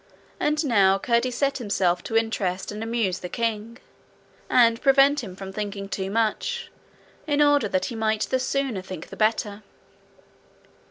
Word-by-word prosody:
And 300 +1 +1
now 195 -7 +4
Curdie 235 +4 +1
set 275 +3 -1
himself 190 -6 0
to 225 - 0
interest 200 -5 -1
and 210 +1 -6
amuse 225 -5 -1
the 180 - -7
king, 230 0 -3 0.7
and 230 -2 +4
prevent 275 0 +4
him 190 -4 -8
from 190 0 -8
thinking 200 -1 -4
too 190 -1 -3
much, 230 - -1 0.6
in 290 -1 +1
order 290 -5 +4
that 185 -2 0
he 240 - -5
might 220 -1 0
the 260 - 0
sooner 260 -5 -1
think 185 -3 -9
the - - -9
better. 215 -1 0
225 Hz, 155 wpm, -24 LUFS, 195-255 Hz, 0.7 s, now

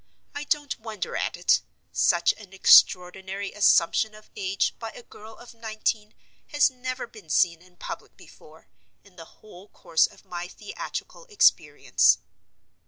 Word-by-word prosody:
I 290 +1 -6
don't 290 -1 -2
wonder 220 -4 -6
at - - -2
it. - - +3 0.3
Such 90 - +2
an 200 -3 -15
extraordinary 190 +1 +4
assumption 210 +1 +3
of 215 - -17
age 195 -1 -1
by 225 - -6
a - - -12
girl 220 0 -14
of 240 - -14
nineteen 220 -1 -3 0.3
has 290 -2 +3
never 255 0 -5
been 215 -8 -16
seen 170 +1 +2
in 180 0 -22
public - - -9
before, - - -18 0.4
in 200 -3 -22
the 165 -2 -11 0.2
whole 195 -1 -14
course 165 -5 +1
of - - -20
my 175 0 -6
theatrical 210 - -8
experience. 435 0 +3
210 Hz, 145 wpm, -25 LUFS, 180-230 Hz, 0.4 s, extraordinary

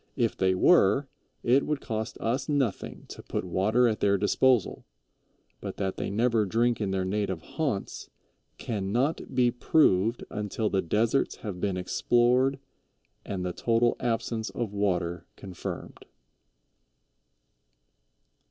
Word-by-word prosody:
If 120 -4 0
they 95 0 +2
were, 135 - +4 0.4
it 130 +4 +4
would 150 -2 -1
cost 110 -3 -4
us 125 +7 -2
nothing 135 -8 -2
to - - -9
put - - -4
water 105 +7 +2
at 110 -2 -1
their 100 0 +3
disposal, 115 +2 +2 0.8
but - - -7
that 95 -1 -2
they - - -3
never 115 +2 +2
drink 115 +3 +1
in 100 - -1
their 95 -1 -1
native 95 -3 -2
haunts 140 -12 -3 0.5
"can 100 -4 -3
not 130 +5 -1
be 125 -1 +4
proved 115 -4 +2
until 105 +1 -2
the 95 - +2
deserts 110 +9 +1
have 95 -4 -5
been 100 -2 -1
explored 125 +8 +2 0.7
and 90 -2 -4
the 90 - -2
total 115 +3 +2
absence 115 -2 -2
of 115 -4 -4
water 90 -4 -1
confirmed." 95 -3 -7
110 Hz, 130 wpm, -27 LUFS, 95-120 Hz, 0.8 s, were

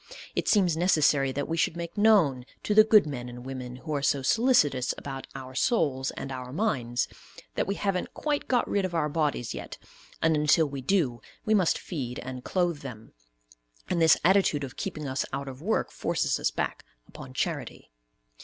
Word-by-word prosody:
It - - -1
seems 185 -6 +4
necessary 155 -5 +3
that 140 +2 -3
we 165 - -1
should 165 +1 +1
make 170 0 -6
known 195 - +4 0.2
to 210 - 0
the 215 +1 +8
good 215 -3 +6
men 125 -5 -5
and 120 +1 -10
women 130 -2 -6
who 155 +5 -6
are 145 - 0
so 140 0 +1
solicitous 150 - +3
about 135 -1 -7
our 130 -1 -8
souls, 140 - +1
and 135 - -6
our 125 -1 -6
minds, 130 - 0 0.5
that - - -1
we 200 - -1
haven't 195 -3 -2
quite 295 -1 -1
got 250 -2 +2
rid 200 - 0
of 185 -2 -3
our 150 -2 +1
bodies 145 -6 -1
yet, - - -7 0.4
and 165 -1 +3
until 150 +2 +4
we 140 -2 -5
do, 130 - +1 0.2
we 220 - +2
must 190 -6 +3
feed 130 -8 -5
and 130 0 -7
clothe 175 -4 0
them; 115 -6 -10 0.8
and 170 - 0
this 160 -1 +6
attitude 185 -6 +3
of 135 -2 -7
keeping 165 -8 -4
us 130 0 -1
out 140 - -4
of 135 +1 -8
work 220 +6 0
forces - - -1
us - - +1
back - - -3 0.2
upon - - -11
charity. - - -3
150 Hz, 190 wpm, -27 LUFS, 130-185 Hz, 0.8 s, the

